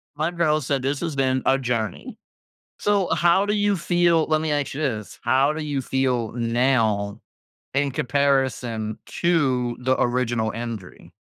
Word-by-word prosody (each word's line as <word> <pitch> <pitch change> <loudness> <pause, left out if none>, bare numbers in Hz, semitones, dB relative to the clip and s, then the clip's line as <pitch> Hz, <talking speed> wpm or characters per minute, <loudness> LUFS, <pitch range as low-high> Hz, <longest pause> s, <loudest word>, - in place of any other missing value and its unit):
My 155 +3 0
girl 170 -3 +1
said, 140 -1 -1
"This 135 +2 -1
has 165 -4 -3
been 130 -1 +1
a 135 - +4
journey." 115 -6 -3 0.6
So, 200 -3 +1
how 175 +3 +3
do 205 - 0
you 205 -1 +2
feel 170 -1 +2
let 155 0 +1
me 160 -1 -1
ask 145 -3 -1
you 145 - -4
this. 110 -8 -3
How 135 +5 +3
do 155 0 -4
you 145 -2 -2
feel 125 -4 0
now 115 -4 +1 0.5
in 140 0 +1
comparison 130 -6 0 0.2
to 130 -8 +1
the 130 +1 0
original 120 -3 0
injury? 115 -5 -7
135 Hz, 155 wpm, -23 LUFS, 120-155 Hz, 0.6 s, a